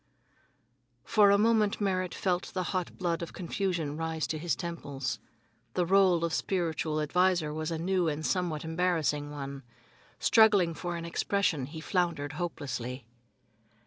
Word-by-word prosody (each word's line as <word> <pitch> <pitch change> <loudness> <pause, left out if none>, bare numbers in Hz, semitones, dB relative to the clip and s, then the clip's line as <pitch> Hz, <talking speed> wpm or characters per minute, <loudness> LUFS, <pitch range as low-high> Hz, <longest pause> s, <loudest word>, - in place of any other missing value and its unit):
For 210 +2 +5
a 200 - +6
moment 215 0 +3
Merrit 185 -3 0
felt 180 -1 -1
the 185 - 0
hot 185 -2 -2
blood 175 -2 -1
of 170 - -6
confusion 175 -4 -2
rise 160 -1 -2
to 155 - -3
his 170 +1 0
temples. 140 -7 -4 0.6
The 180 - +2
role 185 -2 +4
of 165 - -2
spiritual 160 -4 -1
adviser 170 0 +2
was 155 +1 -3
a 165 - -2
new 180 +1 +1
and 155 0 -2
somewhat 175 -5 -1
embarrassing 160 -3 0
one. 140 -1 -6 0.6
Struggling 205 -7 +5
for 175 +1 -4
expression, 170 -3 0
he 160 +2 -8
floundered 165 -5 0
hopelessly. 130 -6 -4
170 Hz, 140 wpm, -30 LUFS, 155-185 Hz, 0.6 s, a